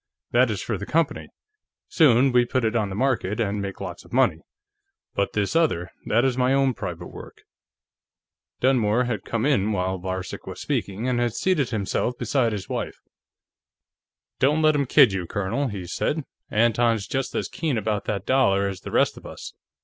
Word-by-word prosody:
That 125 +1 +4
is 105 -3 -3
for 110 -5 -3
the 100 - -6
company; 165 -1 0 0.6
soon 135 -4 +4
we 125 0 +5
put 125 0 -1
it 110 +1 0
on 105 -3 +1
the 95 - -5
market, 120 -4 0
and 105 -2 -1
make 100 -1 -5
lots - - -6
of - - -19
money. - - +3 0.7
But 100 - -1
this 105 +6 -1
other, 90 - +1 0.2
that 120 +4 +3
is 130 -1 0
my 130 +1 +3
own 135 -1 +2
private 90 -5 -6
work." - - -12 1.2
Dunmore 125 -3 +3
had 120 -4 -3
come 115 +1 -2
in 110 -8 +2
while 95 -1 -1
Varcek 95 0 -5
was - - -7
speaking 100 +5 -2
and 125 -1 +1
had 120 -2 0
seated 165 -9 +1
himself 115 +2 -1
beside 120 0 +1
his 100 -4 -5
wife. - - -4 1.4
"Don't 150 +4 +3
let 155 0 +5
him 140 -2 0
kid 130 -6 +6
you, 90 -3 -3
Colonel," 100 +9 -1
he 100 -6 -5
said. 150 - -2 0.3
"Anton's 115 -1 +2
just 135 -1 -3
as - - -1
keen 155 -7 -2
about 105 -1 -1
that 100 -3 -3
dollar 100 -7 +3
as 95 -2 -5
the - - -7
rest - - +2
of - - -10
us. - - -9
115 Hz, 185 wpm, -24 LUFS, 100-130 Hz, 1.4 s, kid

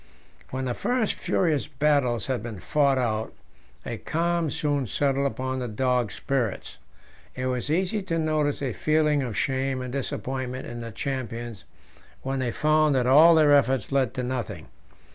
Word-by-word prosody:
When 130 0 -3
the 125 - -1
first 245 - 0
furious 160 -6 0
battles 140 -5 +1
had 130 -4 -1
been 110 -3 -7
fought 140 +4 +2
out, 110 -3 -1 0.5
a - - -4
calm 170 0 0
soon 145 -3 -1
settled 140 +4 +1
upon 130 -1 -3
the 125 - -3
dogs' 125 0 0
spirits. 125 -7 -2 0.6
It 130 - -3
was 130 +1 -2
easy 190 +6 0
to 170 -3 -2
notice 155 -3 0
a 130 -4 -1
feeling 155 +1 +2
of 120 -5 -4
shame 135 0 0
and 125 -1 -5
disappointment 130 -1 -3
in 120 0 -7
the 115 0 -6
champions 120 -4 -5 0.6
when 135 0 -2
they 130 -2 0
found 155 +1 +3
that 125 -2 +2
all 155 +6 +7
their 155 -2 +5
efforts 135 -4 +3
led 135 -3 +1
to 125 - -2
nothing. 120 -9 -4
135 Hz, 160 wpm, -26 LUFS, 125-150 Hz, 0.6 s, all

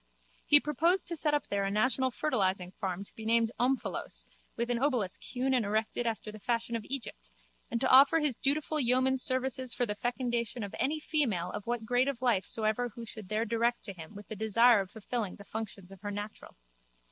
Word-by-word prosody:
He 290 - +10
proposed 335 +6 +2
to 340 - -1
set 300 -2 +1
up 290 - -1
there 200 0 -1
a 195 - 0
national 250 +5 +1
fertilising 190 -9 0
farm 190 -2 -4
to - - -15
be 220 - -10
named 230 0 +2
Omphalos 255 +2 -1 0.3
with 235 +1 -1
an 240 - 0
obelisk 245 -9 0
hewn 260 +1 -1
and 250 -3 +2
erected 220 +3 -1
after 220 -1 -3
the 215 - -11
fashion 235 +2 -1
of 225 - -3
Egypt 145 - -6 0.4
and 235 - -1
to 260 - +2
offer 275 +5 +7
his 295 -5 0
dutiful 305 +4 0
yeoman 260 +1 +3
services 255 -1 -1
for 245 - +2
the 210 - -1
fecundation 240 0 -2
of 200 - -6
any 300 +4 0
female 235 - 0
of 205 - -7
what 240 -2 -2
grade 245 +3 +2
of 275 -4 -2
life 235 -6 +1
soever 220 +2 -1
who 235 +1 -9
should 215 -4 -9
there 215 +2 0
direct 235 +2 0
to 200 - -5
him 165 +2 -11
with 205 -1 -10
the 220 - -6
desire 220 +2 +5
of 190 - -7
fulfilling 220 -1 -4
the 200 - -12
functions 200 -4 -7
of 195 -1 -13
her 205 - -4
natural. 205 +1 -7
235 Hz, 210 wpm, -31 LUFS, 210-260 Hz, 0.4 s, He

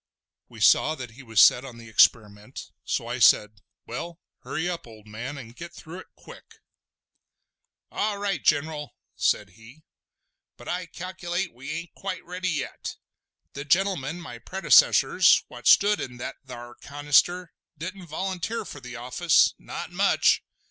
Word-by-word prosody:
We - - -13
saw 155 - +5
that 130 -5 -8
he 125 +5 -14
was 115 -5 -1
set 125 - +7
on 125 -4 -10
the 115 -1 -12
experiment, 105 -1 +1
so - - -2
I - - -4
said: 105 -1 +4 0.2
"Well, 170 +8 -7 0.2
hurry 170 +2 -4
up, 175 -7 -4
old 110 -2 -15
man, 115 +7 -7
and 120 -3 -11
get 170 +4 -9
through 170 +3 -10
it - - -13
quick!" - - -15 1.4
"All 210 -1 -1
right, 200 -6 -2
General," 150 0 0 0.2
said - - 0
he, 115 - -17 0.7
"but - - -13
I 180 0 -3
calculate 175 +1 -4
we 135 +4 -10
ain't 160 +3 -6
quite 190 -2 -6
ready 185 +1 -3
yet. 155 -4 -4 0.6
The 140 - -6
gentlemen, 175 -1 0
my 120 -9 -9
predecessors, 190 - +4
what - - -7
stood 205 +1 +5
in 125 -1 -6
that 120 - -6
thar 120 -1 -9
canister, 145 +6 +1 0.2
didn't 180 +3 -7
volunteer 190 +7 -3
for 145 - -9
the 125 -1 -9
office—not 125 +8 +1
much! - - +3
150 Hz, 150 wpm, -25 LUFS, 120-180 Hz, 1.4 s, set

